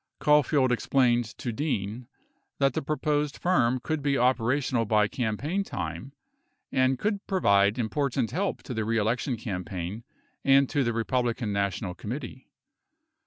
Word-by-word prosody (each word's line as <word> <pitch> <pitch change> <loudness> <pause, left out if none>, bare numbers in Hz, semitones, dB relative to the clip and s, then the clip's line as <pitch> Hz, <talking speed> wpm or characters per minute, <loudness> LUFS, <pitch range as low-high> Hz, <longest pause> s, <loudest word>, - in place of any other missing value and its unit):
Caulfield 145 -3 +3
explained 120 -1 +2
to 120 - -3
Dean 115 -3 -3 0.5
that 135 -2 +2
the - - -1
proposed 150 0 -1
firm 130 -9 +2
could 155 +4 -2
be 140 -1 +1
operational 125 0 +1
by 105 -1 +3
campaign 135 - -2
time 85 - -5 0.6
and 130 0 +2
could 205 - -1
provide 100 - +3
important 125 +1 -1
help 195 +3 -2
to 125 - -6
the 110 -2 -1
reelection 115 +3 0
campaign 95 -1 -5 0.4
and 135 0 +5
to 145 - +2
the 120 - 0
Republican 115 -1 -1
National 100 -2 -1
Committee. 125 +6 -7
125 Hz, 130 wpm, -27 LUFS, 110-140 Hz, 0.6 s, and